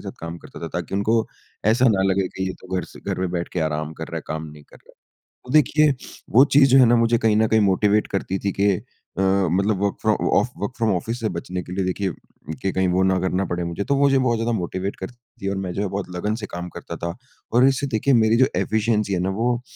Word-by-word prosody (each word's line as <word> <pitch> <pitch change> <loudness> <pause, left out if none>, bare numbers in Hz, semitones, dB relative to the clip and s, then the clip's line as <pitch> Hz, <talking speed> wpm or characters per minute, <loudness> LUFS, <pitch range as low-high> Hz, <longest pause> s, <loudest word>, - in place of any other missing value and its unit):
साथ - - -7
काम 85 +1 -6
करता - - -12
था - - -3
ताकि - - -4
उनको 105 +3 +2 0.5
ऐसा 125 +3 +3
ना 100 -4 +2
लगे 95 0 +1
कि 95 0 -4
ये - - -3
तो 95 - -14
घर 90 - -2
से - - -14
घर - - -4
पे 95 - +1
बैठकर 85 -1 -2
आराम 75 0 -2
कर - - -7
रहा - - -5
है, - - -4
काम 80 0 -4
नहीं 75 0 -14
कर - - -16
रहा। - - -22 0.5
तो 125 - -8
देखिए 150 -1 +4 0.4
वो 130 - +9
चीज़ 135 -1 +6
जो 135 - +6
है 125 - +7
ना 120 +1 +4
मुझे 115 0 +3
कहीं 110 -2 +2
न 110 0 +3
कहीं 110 0 +3
मोटीवेट 105 +2 +2
करती 95 -1 -2
थी 100 - -1
कि 100 0 +4 0.5
अ, - - +2
मतलब 95 +1 +2
work 100 - 0
from 110 -1 +1
off 125 - -1
work 100 - -3
from 115 -3 +1
office 115 +7 -3
से 110 -2 -1
बचने 90 +1 -4
के 90 - -11
लिए 95 -1 -1
देखिए 95 0 -1 0.5
कि 95 - 0
कहीं 95 0 +1
वो 95 +1 +2
ना 95 0 +2
करना 95 +1 0
पड़े 85 0 -3
मुझे। 85 +4 -3
तो 140 - 0
वो 140 0 +4
जो 135 -1 +3
बहुत 120 -3 +1
ज़्यादा 115 +1 -1
मोटीवेट 95 +2 -3
करती 110 +6 -8 0.3
थी - - +1
और 100 - -2
मैं 95 -2 -3
जो 100 - -2
है 105 - 0
बहुत 100 -1 -4
लगन 105 +5 -1
से - - -3
काम 90 0 -5
करता - - -7
था। 85 0 -4 0.4
और 125 +3 +5
इससे 135 +1 +1
देखिए 130 +3 +1
मेरी 110 -1 +4
जो 130 - +6
एफ़िशिएंसी 105 -2 0
है 90 - 0
ना 95 +2 0
वो 120 +1 +1
100 Hz, 265 wpm, -22 LUFS, 95-115 Hz, 0.5 s, वो